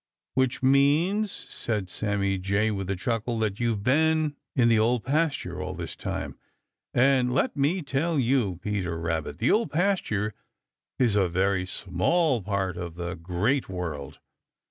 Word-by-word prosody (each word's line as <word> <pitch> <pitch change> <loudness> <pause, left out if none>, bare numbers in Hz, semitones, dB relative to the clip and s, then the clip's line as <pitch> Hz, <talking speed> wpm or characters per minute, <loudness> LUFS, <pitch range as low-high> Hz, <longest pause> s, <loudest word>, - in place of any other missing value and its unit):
"Which 130 0 0
means," 150 +10 +3
said 105 -5 -4
Sammy 100 0 -1
Jay 100 +4 +1
with 95 -2 -3
a 95 - 0
chuckle, 115 +4 -2
"that 105 -2 -1
you've 115 -4 0
been 155 +3 +2 0.2
in 125 -3 +4
the 115 -2 +4
Old 115 +1 +2
Pasture 150 +2 -1
all - - -4
this - - -5
time, - - -5 0.5
and 130 0 +3
let 135 - +1
me 155 +6 +1
tell 150 +4 0
you, 120 -7 +2
Peter 95 -5 -2
Rabbit, 80 -3 -2
the 115 - +2
Old 225 +2 +2
Pasture 150 - 0 0.6
is 120 -5 +2
a 95 -3 +3
very 95 +1 +1
small 115 - +1
part 95 -3 -2
of 85 -2 -5
the 85 0 -4
Great 95 - -1
World. 75 -6 -5
110 Hz, 150 wpm, -26 LUFS, 95-140 Hz, 0.6 s, in